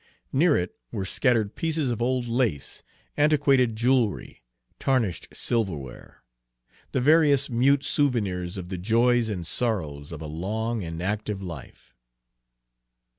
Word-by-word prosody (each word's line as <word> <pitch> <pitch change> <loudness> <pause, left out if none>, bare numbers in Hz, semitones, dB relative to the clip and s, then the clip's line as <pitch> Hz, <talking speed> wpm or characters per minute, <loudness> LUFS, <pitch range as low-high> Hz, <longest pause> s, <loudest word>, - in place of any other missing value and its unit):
Near 150 +2 +4
it 90 - -3 0.2
were 100 -5 -3
scattered 115 0 +1
pieces 160 -5 -1
of 115 - -3
old 125 0 0
lace, 115 - -1 0.3
antiquated 140 -5 +3
jewelry, 120 -2 0 0.4
tarnished 125 -9 0
silverware, 85 - -4 0.7
the - - 0
various 145 -1 +4
mute 135 +4 +3
souvenirs 100 - 0
of 90 -1 -6
the 95 -2 -4
joys 115 +4 +2
and 90 -5 -4
sorrows 80 -10 -2
of 80 - -6
a 80 - -7
long 105 +8 -3
and 80 +1 -5
active 105 +1 -2
life. 85 -7 -10
115 Hz, 125 wpm, -26 LUFS, 90-130 Hz, 0.7 s, Near